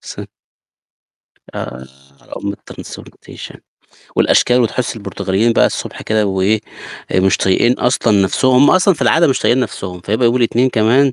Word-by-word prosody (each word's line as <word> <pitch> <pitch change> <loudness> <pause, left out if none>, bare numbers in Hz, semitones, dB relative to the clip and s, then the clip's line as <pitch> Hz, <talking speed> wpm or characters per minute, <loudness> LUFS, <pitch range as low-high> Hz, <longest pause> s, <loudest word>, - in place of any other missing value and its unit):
س - - -9 1.3
آآ 65 +2 -7 0.4
على - - -23
أم 100 0 -4
الTransportation. - - -12 0.6
والأشكال 125 0 +3
وتحس 120 +1 -2
البرتغاليين 105 +1 -1
بقى - - +3
الصبح - - -6
كده 110 -1 0
وإيه 95 +3 0 0.5
مش 95 0 +2
طايقين 95 +6 +2
اصلًا 115 -5 +1
نفسهم. 130 +7 +1
هم 135 +3 +5
اصلًا 185 +1 +3
في - - -5
العادة 165 +1 +3
مش 135 - 0
طايقين 125 +2 +2
نفسهم. 95 -7 -5
فهيبقى 110 +7 0
يوم 120 +2 +2
الاتنين 120 +1 +1
كمان. 125 +5 +2
115 Hz, 145 wpm, -16 LUFS, 100-125 Hz, 1.3 s, هم